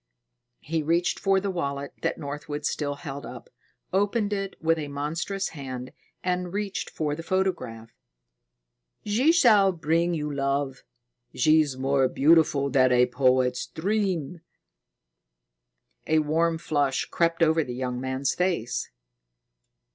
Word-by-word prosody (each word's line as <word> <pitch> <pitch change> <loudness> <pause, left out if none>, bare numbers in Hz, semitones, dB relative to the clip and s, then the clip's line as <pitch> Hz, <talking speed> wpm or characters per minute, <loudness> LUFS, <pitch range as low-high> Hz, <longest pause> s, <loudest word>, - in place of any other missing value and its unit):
He 160 +1 -2
reached 170 +3 +1
for 195 -1 +3
the 195 0 -2
wallet 140 -5 -3
that - - -1
Northwood 145 +1 -5
still 145 -2 -1
held, 140 -1 -7 0.7
opened 205 +2 +1
it 195 -1 -3
with 165 0 +1
a 150 - -4
monstrous 160 +7 -3
hand, 130 -4 -7 0.3
and 180 -1 -1
reached 200 0 -3
for 150 -2 -2
the 160 - -5
photograph. 165 -12 -2 1.1
"She 240 +10 +3
shall 215 - +5
bring 170 +1 0
you 150 -2 -3
love. 140 -1 -1 0.5
She's 155 -1 +3
more 135 0 +2
beautiful 145 -1 +3
than 130 -1 +4
a 125 0 +5
poet's 125 0 +1
dream." 180 -4 -2 1.7
A 160 - +3
warm 160 +2 +1
flush 145 -4 0
crept 170 0 +1
over 160 0 +3
the 125 -3 -6
young 125 -1 -3
man's 130 +1 -1
face. 125 -10 -1
155 Hz, 125 wpm, -26 LUFS, 135-180 Hz, 1.7 s, shall